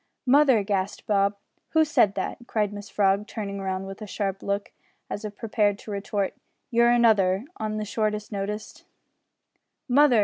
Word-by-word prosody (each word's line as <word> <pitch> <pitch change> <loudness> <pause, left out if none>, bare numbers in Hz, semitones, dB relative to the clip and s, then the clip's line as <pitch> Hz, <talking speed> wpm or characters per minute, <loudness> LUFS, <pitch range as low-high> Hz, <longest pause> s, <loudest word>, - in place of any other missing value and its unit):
"Mother!" 265 -4 +5
gasped 195 -1 -2
Bob. 200 -1 +2 0.4
"Who 320 -1 +5
said 215 -9 +3
that?" - - -3
cried 210 -2 0
Mrs 205 +1 -8
Frog, 200 +1 +2
turning 200 -3 -5
round 190 0 -2
with 195 +2 -8
a 215 - -6
sharp 195 -1 -3
look, 200 0 -2 0.4
as 205 - -4
if 210 -1 -6
prepared 210 -2 +1
to 210 - -9
retort 200 -1 -2 0.4
"you're 235 0 +5
another" 220 -4 +4
on 215 0 -3
the 215 - -2
shortest 210 0 -2
notice. 210 +1 -5 1.0
"Mother!" 260 -2 +5
210 Hz, 160 wpm, -26 LUFS, 200-220 Hz, 1.0 s, Mother